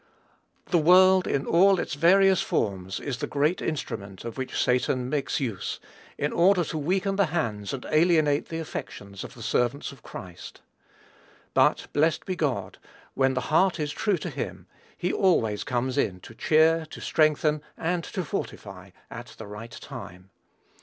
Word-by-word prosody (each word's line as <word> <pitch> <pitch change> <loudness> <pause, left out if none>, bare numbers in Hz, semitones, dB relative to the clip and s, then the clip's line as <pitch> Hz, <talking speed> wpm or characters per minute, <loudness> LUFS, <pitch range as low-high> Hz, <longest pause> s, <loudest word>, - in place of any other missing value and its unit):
The 175 - +4
world 185 +3 +6
in 140 - 0
all 190 +2 +4
its - - -3
various 190 +5 +5
forms 95 -2 -2
is 135 -4 -4
the - - -2
great 150 +5 0
instrument 100 -10 -5
of 115 - -5
which 130 -1 -4
Satan 125 0 +1
makes 145 -2 -1
use, 115 -9 -3 0.4
in 145 - -1
order 180 +1 +4
to 160 - -4
weaken 190 +5 0
the 200 -3 +3
hands 115 -11 -2
and 135 -2 -5
alienate 155 -2 +3
the 165 - -4
affections 100 -10 -7
of - - -10
the 115 - -9
servants 125 +5 0
of 135 - -15
Christ. 90 -2 -10 0.9
But, - - +3
blessed 155 +1 +1
be 185 - -2
God, 125 - -2 0.3
when 135 0 +2
the 130 - 0
heart 185 +1 +3
is 150 -1 -2
true 200 +4 0
to - - -5
him, - - -5 0.3
he 180 - -1
always 115 - +2
comes 125 -1 -1
in 90 -2 0
to 115 - -12
cheer, 160 +5 +3
to - - -10
strengthen, 155 -1 +2 0.2
and 170 +1 -1
to 185 -3 -4
fortify, 100 -8 -6 0.2
at 120 +1 -9
the 110 - -8
right 105 +3 -8
time. 90 +2 -10
145 Hz, 165 wpm, -26 LUFS, 115-170 Hz, 0.9 s, world